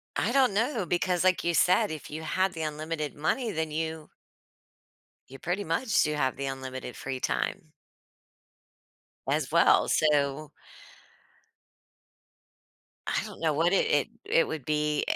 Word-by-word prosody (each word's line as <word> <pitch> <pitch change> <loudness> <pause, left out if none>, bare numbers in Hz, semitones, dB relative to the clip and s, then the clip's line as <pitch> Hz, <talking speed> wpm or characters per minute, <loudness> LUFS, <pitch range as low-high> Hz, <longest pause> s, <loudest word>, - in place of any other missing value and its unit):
I - - 0
don't 265 -5 +4
know 225 0 0
because 175 +1 0
like 185 -1 +3
you 170 - +1
said, 185 +6 +4
if 155 -2 -7
you 155 +2 -5
had 185 +4 +1
the 160 -2 -4
unlimited 155 0 -4
money, 220 - -1
then 160 -3 -2
you 160 0 -4 1.2
you 135 - -11
pretty 175 +5 -2
much 200 +8 +1
do 150 - 0
have 130 -3 0
the 140 - -4
unlimited 130 -2 -6
free 135 -1 -4
time - - -2 1.6
as - - 0
well, - - +5
so 150 -1 +1 2.6
I - - 0
don't - - -10
know 160 -2 +1
what 165 +5 +2
it 195 - +3
it 145 -2 +2 0.2
it 165 - +3
would 155 -5 -5
be 150 0 0
eh - - +1
160 Hz, 145 wpm, -28 LUFS, 150-180 Hz, 2.6 s, well